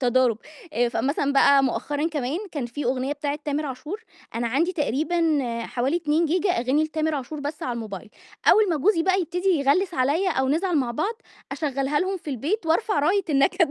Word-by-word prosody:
تضارب، 250 Hz, -3 st, +2 dB, 0.5 s
فمثلًا 280 Hz, +2 st, 0 dB
بقى 275 Hz, 0 st, +5 dB
مؤخرًا 290 Hz, +4 st, -1 dB
كمان 295 Hz, -1 st, -2 dB
كان 285 Hz, -6 st, -3 dB
في 245 Hz, +4 st, -5 dB
أغنية 260 Hz, +3 st, 0 dB
بتاعة 290 Hz, 0 st, -3 dB
تامر 295 Hz, +1 st, -1 dB
عاشور، 295 Hz, -, -6 dB, 0.3 s
أنا 235 Hz, +1 st, -1 dB
عندي 330 Hz, +9 st, +1 dB
تقريبًا 315 Hz, +1 st, +1 dB, 0.3 s
حوالي 260 Hz, +7 st, 0 dB
2 320 Hz, 0 st, +1 dB
جيجا 365 Hz, +4 st, +1 dB
أغاني 270 Hz, +2 st, +1 dB
لتامر 315 Hz, 0 st, -1 dB
عاشور 285 Hz, +2 st, -5 dB
بس 290 Hz, +2 st, -5 dB
على 250 Hz, -, -2 dB
الموبايل، 215 Hz, -2 st, -7 dB, 0.4 s
أول 430 Hz, -2 st, +6 dB
ما 320 Hz, -, +1 dB
جوزي 335 Hz, +3 st, +2 dB
بقى 375 Hz, +2 st, +2 dB
يبتدي 360 Hz, +3 st, -2 dB
يغلّس 340 Hz, +3 st, +2 dB
عليَّ 290 Hz, +9 st, +1 dB
أو 265 Hz, -5 st, 0 dB
نزعل 335 Hz, +3 st, +1 dB
مع 245 Hz, -3 st, 0 dB
بعض 400 Hz, -, -1 dB, 0.4 s
أشغلّها 280 Hz, -1 st, -1 dB
لهم 380 Hz, +1 st, -1 dB
في 320 Hz, -4 st, -7 dB
البيت 315 Hz, -, -2 dB
وأرفع 335 Hz, +2 st, +1 dB
راية 365 Hz, +6 st, +2 dB
النكد. 290 Hz, +3 st, +3 dB
295 Hz, 180 wpm, -24 LUFS, 265-340 Hz, 0.5 s, أول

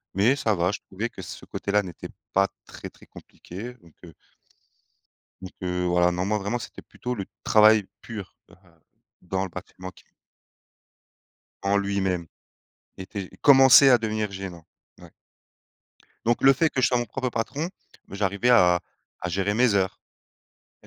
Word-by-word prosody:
mais 110 Hz, +8 st, +3 dB
ça 110 Hz, -7 st, 0 dB
va, 90 Hz, +1 st, +1 dB
je 105 Hz, -, -5 dB
trouvais 105 Hz, +5 st, -4 dB
que -, -, -10 dB
ce -, -, -9 dB
côté 100 Hz, -, -5 dB
là 105 Hz, 0 st, +3 dB
n'était 90 Hz, -3 st, -9 dB, 0.2 s
pas 100 Hz, +1 st, +3 dB, 0.2 s
très -, -, -10 dB
très -, -, -20 dB
compliqué, 110 Hz, +8 st, -10 dB
donc, 85 Hz, -9 st, -22 dB
heu 85 Hz, -2 st, -12 dB, 1.3 s
donc 95 Hz, 0 st, -9 dB
heu, 90 Hz, 0 st, -2 dB
voilà, 90 Hz, 0 st, +3 dB
non, 90 Hz, +1 st, -2 dB
moi, 105 Hz, +1 st, 0 dB
vraiment, 105 Hz, +4 st, -2 dB
c'était -, -, -10 dB
plutôt 125 Hz, 0 st, -6 dB
le 100 Hz, -5 st, -5 dB, 0.2 s
travail 110 Hz, -1 st, +5 dB, 0.2 s
pur, 105 Hz, -5 st, -8 dB
heu, -, -, -16 dB, 0.7 s
dans 95 Hz, +1 st, -2 dB
le -, -, -5 dB
bâtiment 95 Hz, +2 st, -9 dB
qui 90 Hz, -, -21 dB, 1.6 s
en 100 Hz, +1 st, +1 dB
lui-même 95 Hz, -3 st, -1 dB, 0.7 s
était 95 Hz, 0 st, -6 dB
commençait 135 Hz, 0 st, +8 dB
à 125 Hz, -, +6 dB
devenir 110 Hz, -2 st, -2 dB
gênant, 95 Hz, -4 st, -8 dB, 0.4 s
ouais. -, -, -14 dB, 1.2 s
Donc, 120 Hz, 0 st, +1 dB
le 135 Hz, -, +7 dB
fait 160 Hz, +5 st, +2 dB
que 130 Hz, -, -1 dB
je -, -, +6 dB
sois 125 Hz, -, +1 dB
mon 120 Hz, -, -2 dB
propre 130 Hz, +3 st, -3 dB
patron, 140 Hz, +8 st, -3 dB, 0.4 s
bah, 95 Hz, -, -8 dB
j'arrivais 100 Hz, +4 st, +1 dB
à 90 Hz, -7 st, +5 dB, 0.4 s
à 90 Hz, -, -2 dB
gérer 95 Hz, +3 st, -1 dB
mes 120 Hz, 0 st, +3 dB
heures. 95 Hz, -1 st, 0 dB, 0.8 s
Il -, -, -22 dB
100 Hz, 165 wpm, -25 LUFS, 95-120 Hz, 1.6 s, commençait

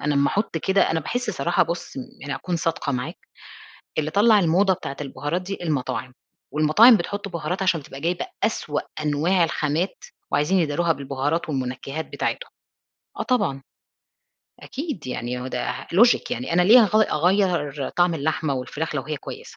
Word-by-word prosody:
أنا 150 Hz, 0 st, 0 dB
امّا 140 Hz, 0 st, +3 dB
أحط 205 Hz, -4 st, -1 dB
كده 190 Hz, +4 st, +2 dB
أنا 160 Hz, -, 0 dB
باحس 245 Hz, +8 st, -2 dB
صراحة 175 Hz, -1 st, +1 dB
بُصّ، 170 Hz, -4 st, -4 dB
م -, -, -3 dB, 0.2 s
يعني 140 Hz, -1 st, -4 dB
أكون 175 Hz, +5 st, -3 dB
صادقة 165 Hz, -3 st, -1 dB
معاك، 125 Hz, -1 st, -4 dB, 0.8 s
اللي 155 Hz, 0 st, 0 dB
طلّع 210 Hz, +2 st, +5 dB
الموضة 190 Hz, +2 st, +3 dB
بتاعة 140 Hz, -5 st, -6 dB
البهارات 145 Hz, +4 st, -3 dB
دي 195 Hz, +2 st, -5 dB
المطاعم، 130 Hz, -5 st, -2 dB, 0.4 s
والمطاعم 155 Hz, +11 st, +7 dB
بتحط 200 Hz, +3 st, -4 dB
بهارات 175 Hz, +1 st, -3 dB
عشان 170 Hz, -5 st, +1 dB
تبقى 135 Hz, 0 st, -10 dB
جايبة 175 Hz, +3 st, -1 dB, 0.2 s
أسوأ 150 Hz, -9 st, -1 dB, 0.2 s
أنواع 155 Hz, +5 st, +2 dB
الخامات 160 Hz, +2 st, -1 dB, 0.3 s
وعايزين 180 Hz, +6 st, +2 dB
يداروها 165 Hz, +2 st, +1 dB
بالبهارات 140 Hz, +3 st, -2 dB
والمنكّهات 135 Hz, +3 st, -3 dB
بتاعتهم، -, -, -3 dB, 0.7 s
آه -, -, 0 dB
طبعًا. 205 Hz, -, 0 dB, 1.0 s
أكيد 275 Hz, -, -5 dB
يعني 125 Hz, 0 st, -4 dB
هو 125 Hz, -, -5 dB
ده 125 Hz, -1 st, -3 dB
لوجك 235 Hz, +7 st, +4 dB
يعني 125 Hz, +6 st, -3 dB
أنا 180 Hz, +1 st, +4 dB
ليه 225 Hz, +7 st, +8 dB
هاغ 215 Hz, 0 st, +4 dB
أغيّر 165 Hz, -5 st, +1 dB
طعم 175 Hz, -1 st, +3 dB
اللحمة 155 Hz, -1 st, -1 dB
والفراخ 150 Hz, +5 st, -4 dB
لو 140 Hz, -, -1 dB
هي 155 Hz, +2 st, -4 dB
كويسة؟! -, -, -9 dB
160 Hz, 160 wpm, -23 LUFS, 140-185 Hz, 1.0 s, ليه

